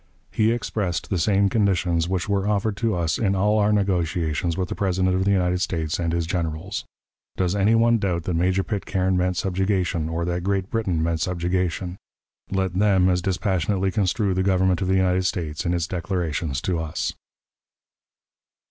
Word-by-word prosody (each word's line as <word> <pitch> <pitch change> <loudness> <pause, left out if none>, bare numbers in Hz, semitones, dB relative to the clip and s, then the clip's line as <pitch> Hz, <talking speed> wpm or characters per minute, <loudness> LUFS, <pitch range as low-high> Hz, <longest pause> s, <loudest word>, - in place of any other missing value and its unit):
he 110 0 +2
expressed 105 -6 -2
the 95 - +1
same 100 +3 +3
conditions 90 -5 +1
which 95 0 -1
were 100 -1 0
offered 105 0 0
to 115 0 0
us 85 -2 0
in 100 -3 +1
all 105 +3 +2
our 105 0 +3
negotiations 85 -5 0
with 95 -1 -1
the - - -4
President 95 -1 0
of 95 +1 +1
the 100 - +3
United 90 -2 +1
States 85 -4 -1
and 85 -1 0
his 85 0 0
generals. 85 +3 -3 0.5
Does 90 0 0
any 100 +3 +3
one 115 0 +4
doubt 90 -5 -1
that 90 - -2
Major 90 +3 +1
Pitcairn 95 -3 -1
meant 90 0 0
subjugation, 95 -4 0
or 85 +1 -2
that 90 0 -2
Great 95 -1 -1
Britain 95 -8 0
meant 80 -1 -1
subjugation? 90 0 -1 0.5
Let 95 -2 -1
them 95 -1 +3
as 90 -1 +1
dispassionately 95 0 0
construe 100 +1 +1
the 95 - 0
Government 95 -1 +2
of 95 - 0
the 95 - +2
United 95 0 +2
States 80 -4 -3
in 85 - +1
its 85 -2 0
declarations 85 -5 -2
to 90 -3 -1
us. 80 -1 -3
95 Hz, 175 wpm, -23 LUFS, 85-100 Hz, 0.5 s, one